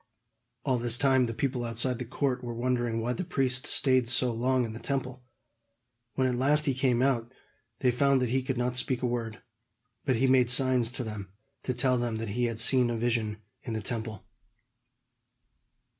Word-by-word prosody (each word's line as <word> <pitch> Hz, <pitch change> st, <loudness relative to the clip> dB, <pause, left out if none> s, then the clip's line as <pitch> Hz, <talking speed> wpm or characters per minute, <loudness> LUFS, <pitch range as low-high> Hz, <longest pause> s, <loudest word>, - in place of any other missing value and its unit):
All 130 Hz, -3 st, +1 dB
this 120 Hz, 0 st, +2 dB
time 130 Hz, -2 st, +3 dB
the 115 Hz, -, -4 dB
people 130 Hz, -2 st, -2 dB
outside 120 Hz, +2 st, -1 dB
in 125 Hz, -, -3 dB
the 125 Hz, -, -4 dB
court 130 Hz, +1 st, -2 dB
were 120 Hz, -1 st, -5 dB
wondering 120 Hz, -1 st, -1 dB
why 120 Hz, +2 st, -1 dB
the 185 Hz, -, -4 dB
priest 130 Hz, -7 st, 0 dB
stayed 130 Hz, -3 st, +2 dB
so 120 Hz, +1 st, +2 dB
long 125 Hz, +2 st, +1 dB
in 110 Hz, -, -6 dB
the 115 Hz, -, -8 dB
Temple. 130 Hz, -2 st, -3 dB, 0.9 s
When 130 Hz, -, +1 dB
at 130 Hz, -, +1 dB
last 145 Hz, +5 st, +2 dB
he 140 Hz, -, +1 dB
came 130 Hz, -2 st, +1 dB
out, 120 Hz, -3 st, 0 dB, 0.5 s
they 125 Hz, -, +3 dB
found 135 Hz, +2 st, +2 dB
that 125 Hz, -2 st, -1 dB
he 130 Hz, +2 st, +1 dB
could 130 Hz, 0 st, -3 dB
not 125 Hz, 0 st, -1 dB
speak 125 Hz, 0 st, 0 dB
a -, -, +2 dB
word; 115 Hz, -2 st, -4 dB, 0.6 s
but 130 Hz, -3 st, +1 dB
he 125 Hz, +4 st, +1 dB
made 130 Hz, -2 st, +4 dB
signs 125 Hz, -2 st, +3 dB
to 130 Hz, -, -2 dB
them, 105 Hz, -4 st, -7 dB, 0.3 s
to 125 Hz, -, -3 dB
tell 125 Hz, +1 st, +2 dB
them 120 Hz, -2 st, -2 dB
that 110 Hz, -1 st, -4 dB
he 120 Hz, +4 st, -1 dB
had 115 Hz, -2 st, -3 dB
seen 125 Hz, +1 st, +5 dB
a 120 Hz, -, -2 dB
vision 110 Hz, -2 st, -2 dB, 0.2 s
in 120 Hz, -5 st, -6 dB
the 110 Hz, -, -3 dB
Temple. 110 Hz, -2 st, -4 dB
125 Hz, 200 wpm, -28 LUFS, 115-130 Hz, 0.9 s, seen